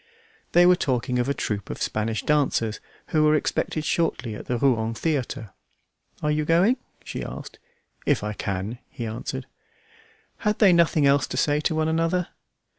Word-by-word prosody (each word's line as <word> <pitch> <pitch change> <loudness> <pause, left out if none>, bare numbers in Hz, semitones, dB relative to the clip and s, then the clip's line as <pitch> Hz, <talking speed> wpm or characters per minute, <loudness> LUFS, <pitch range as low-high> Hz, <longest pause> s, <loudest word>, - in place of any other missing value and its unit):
They 175 0 +7
were 180 0 +7
talking 125 -6 0
of 125 +2 0
a - - +2
troupe 105 -3 -3
of - - -5
Spanish 110 +1 -1
dancers 135 -7 +1 0.3
who 155 -1 +3
were 155 0 +5
expected 155 0 -1
shortly 130 -9 0
at 105 - -8
the 125 - 0
Rouen 115 -3 +1
theatre. 130 - -2 0.7
"Are 150 - +2
you 150 0 +1
going?" 175 - +3 0.3
she - - -5
asked. - - -8 0.5
"If 140 -7 +2
I 105 0 -2
can," 100 +4 -4
he 125 -4 -6
answered. 120 +4 -4 0.9
Had 210 -1 0
they 195 -5 +6
nothing 165 -3 +4
else 140 -2 +4
to - - -5
say 145 +2 +2
to 155 +1 0
one 155 0 +1
another? 165 +2 0
140 Hz, 170 wpm, -25 LUFS, 115-160 Hz, 0.9 s, They